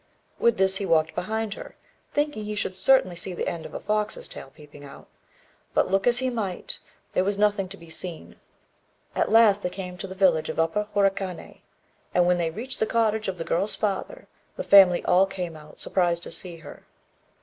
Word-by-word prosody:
With 235 -1 +3
this 190 0 +3
he 200 - -3
walked 160 -1 +2
behind 220 +2 -2
her, - - -10 0.4
thinking 290 -7 -1
he 210 0 -4
should 190 -2 -2
certainly 190 -2 +3
see 180 +1 -4
the - - -3
end 165 -1 -4
of - - -13
a - - -3
fox's 210 0 -2
tail - - -10
peeping 145 0 -15
out; 140 - -12 0.7
but, - - +2
look 195 +2 +2
as 240 0 +5
he 260 0 +1
might, 230 - -4 0.3
there 185 - +2
was 200 +1 0
nothing 205 -2 +1
to 200 - -8
be 170 - -14
seen. 170 0 -6 0.8
At - - +1
last 215 -3 +6
they 180 - -1
came 180 -1 -7
to 195 - -5
the 190 - -8
village 180 -5 +3
of - - -4
Upper 210 +6 +1
Horikané; 195 -3 -1 0.5
and 175 0 +5
when 180 0 +3
they 165 -1 0
reached 240 +10 -5
the 220 - +1
cottage 220 -2 +1
of 190 -1 -3
the 165 - -3
girl's 195 +5 0
father, 215 - -3 0.3
the - - -4
family 190 -3 +6
all 190 +2 +4
came 180 -4 -5
out, 150 -1 -14
surprised 175 -2 0
to - - -7
see 175 0 -4
her. 160 -3 -13
190 Hz, 205 wpm, -25 LUFS, 175-210 Hz, 0.8 s, last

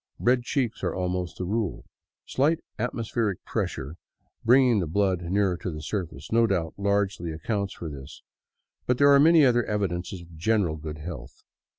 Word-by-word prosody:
Red 125 +1 +3
cheeks 125 -1 -2
are - - -1
almost 90 -2 -2
the 90 - -3
rule. 105 0 -2 0.4
Slight 150 +5 +1 0.2
atmospheric 115 -4 -2
pressure, 70 +5 -3 0.5
bringing 125 -2 +5
the 85 - -1
blood 95 +1 +1
nearer 90 0 0
the 80 -5 -4
surface, 80 -3 -5
no 115 0 +4
doubt 85 -6 -1
largely 100 -4 0
accounts 100 +5 -3
for 85 - -6
this, 70 -1 -9 0.6
but 125 - +2
there 140 +1 +6
are 140 - +7
many 160 0 +7
other 120 -2 +4
evidences 95 -3 -2
of 85 -1 -15
general 90 -2 +1
good 75 0 -6
health. 75 -4 -9
100 Hz, 160 wpm, -26 LUFS, 85-115 Hz, 0.6 s, are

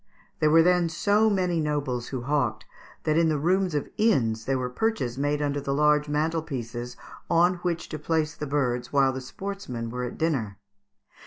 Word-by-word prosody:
There 155 - +3
were 165 +1 +6
then 180 -1 +3
so 205 +6 +2
many 180 -4 +1
nobles 145 -5 -1
who 130 -2 -4
hawked, 125 -6 0 0.4
that 155 0 +2
in 165 -1 +3
the 155 - +1
rooms 180 +3 +1
of 145 - -1
inns 115 - +2
there 135 0 +1
were 125 -1 -2
perches 125 - -1
made 145 +2 0
under 145 0 -1
the 140 0 -2
large 150 0 +3
mantel 160 +2 0
pieces 120 -4 -6 0.3
on 175 +2 +4
which 175 -1 -3
to 155 - -5
place 155 0 0
the 150 - -6
birds 125 -4 -1
while 135 -2 +3
the 130 - -5
sportsmen 130 -8 -6
were 125 +1 -3
at 125 - -6
dinner. 125 -12 -1
150 Hz, 185 wpm, -26 LUFS, 130-165 Hz, 0.4 s, were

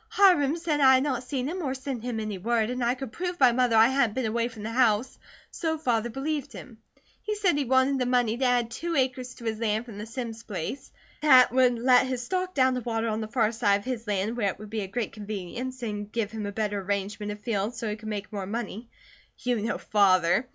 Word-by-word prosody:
Hiram 340 -7 +4
said 325 -3 -1
I 265 -2 +7
had 260 - +2
not 285 -4 -1
seen 255 0 -3
him 360 +4 -3
or 270 -4 -2
sent 265 -2 -5
him 240 -1 -3
any 215 -3 -4
word, 225 +2 0
and 250 0 -2
I 240 +2 +2
could 265 -3 -7
prove 355 +4 -4
by 255 -5 +6
mother 245 -1 +2
I 225 +2 +7
hadn't 260 -5 +1
been 260 -2 -1
away 230 +2 0
from 225 -3 -10
the 220 - -4
house, 235 0 +2 0.3
so 320 -2 -2
Father 240 -6 0
believed 285 +3 -3
him. 230 -3 -11 0.4
He 425 - -3
said 390 -6 +2
he 290 -1 0
wanted 260 +2 +3
the 250 - 0
money 245 -3 +2
to 260 - -3
add 245 -2 +2
two 335 +8 -3
acres 255 -2 -1
to 235 - -11
his 220 -1 -2
land 220 0 0
from 215 -4 -9
the 210 - -6
Simms 230 -1 -6
place; 205 - -6 0.3
that 260 -4 +7
would 250 -1 +3
let 250 +2 +4
his 255 -1 -3
stock 370 +4 -2
down 260 -1 +4
to 250 - -2
water 230 -1 -1
on 215 +1 -2
the 215 - -4
far 225 -1 +1
side 205 -3 +2
of - - -18
his 240 -3 -4
land 205 +2 -1
where 210 -5 +1
it - - -5
would 210 -1 -11
be 220 -1 -2
a 195 - -4
great 220 +2 -3
convenience 215 +5 -6
and 205 -2 -4
give 225 -3 -2
him 215 -2 -4
a - - -4
better 205 -1 -2
arrangement 205 +2 -3
of 210 - -7
fields 210 +1 -2
so 230 - -3
he 210 - -2
could 215 0 -8
make 210 0 -5
more 195 -2 -4
money. 225 +1 -5 0.5
You 245 -1 -1
know 225 +2 -1
Father. 195 +3 +3
235 Hz, 250 wpm, -27 LUFS, 215-260 Hz, 0.5 s, I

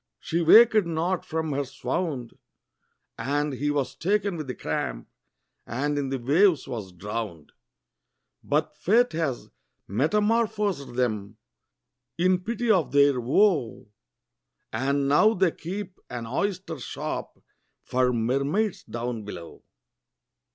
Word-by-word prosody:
she 170 +1 -1
waked 220 +5 +7
not 170 +2 -1
from 160 -1 -3
her 140 0 0
swound, 130 0 -3 0.9
And 145 +1 -1
he 145 +3 -1
was 145 -2 -1
taken 200 +1 0
with 155 -4 -5
the 125 - -4
cramp, - - -3 0.6
and 145 +6 -1
in 140 -2 -1
the 135 - -1
waves 155 +7 +3
was 110 -7 -5
drowned; 100 -3 -6 0.9
But 150 +1 0
Fate 225 +11 +3
has 155 -6 -2 0.4
metamorphosed 205 - 0
them, 110 -4 -1 0.8
in 185 +1 +3
pity 230 +4 -1
of 180 -7 +2
their 140 -3 +4
woe, 140 - +2 0.8
And 140 +4 0
now 215 +11 +5
they 185 -2 +3
keep 190 +3 -7
an 120 -2 -5
oyster 170 - -2
shop 120 - -5 0.5
for 125 0 +1
mermaids 140 - 0
down 120 -1 -4
below. 90 -5 -9
145 Hz, 115 wpm, -26 LUFS, 125-185 Hz, 0.9 s, waked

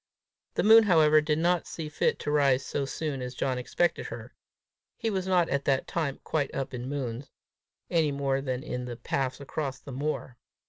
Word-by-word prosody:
The - - +1
moon, 225 +1 +8
however, 155 -5 +5
did 150 0 0
not 175 +1 +1
see 160 -2 -5
fit 150 - 0
to 150 - -2
rise 140 -3 +3
so 140 - -2
soon 140 -1 -3
as 125 0 -5
John 130 -1 -1
expected 170 +7 0
her: - - -8 0.6
he 225 - -1
was 190 -2 -2
not 180 -3 +3
at 140 0 -1
that 135 -2 +2
time 155 -5 -2
quite 150 -3 -1
up 135 0 -3
in 125 +1 -5
moons, 135 -2 -4 0.6
any 160 -4 +2
more 135 -1 0
than 130 -1 -3
in 125 -5 -4
the 120 -1 -6
paths 130 +2 -2
across 140 -1 -4
that 140 - -10
moor. 135 -2 -3
140 Hz, 190 wpm, -28 LUFS, 130-160 Hz, 0.6 s, moon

